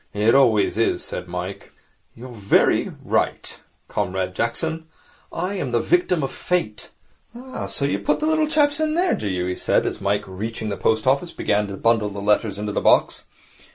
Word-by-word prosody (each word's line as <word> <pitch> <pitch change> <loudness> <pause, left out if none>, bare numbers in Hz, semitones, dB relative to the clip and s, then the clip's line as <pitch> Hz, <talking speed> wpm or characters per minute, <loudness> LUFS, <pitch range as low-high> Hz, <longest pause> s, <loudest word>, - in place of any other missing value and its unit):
'It 105 +2 +3
always 115 -6 +3
is,' 115 - +1
said 90 - -6
Mike. 90 +2 -6 0.4
'You 125 +2 -10
are - - -10
very 100 -3 +2
right, - - -1 0.3
Comrade 95 -2 -2
Jackson. 160 - -2 0.4
I 180 +4 -3
am 180 -10 -3
the 120 - +2
victim 175 +3 +1
of 135 - -2
Fate. 175 -13 -2 0.5
Ah, 260 +2 -7
so 140 - -1
you 100 -8 0
put 100 - 0
the 305 - -1
little 315 0 +2
chaps 295 -1 +2
in 310 0 0
there, 360 +2 +2
do 105 - -3
you?' 90 -2 -1
he 90 - -1
said, - - +1
as - - -3
Mike, 100 +1 0
reaching 110 +3 -5
the 100 - -2
post 110 +4 0
office, 140 +6 +1
began 105 0 0
to 100 -1 -7
bundle 115 -1 +2
the 100 0 -7
letters 105 0 +1
into 105 0 -3
the - - -1
box. - - +3
115 Hz, 190 wpm, -22 LUFS, 100-165 Hz, 0.5 s, It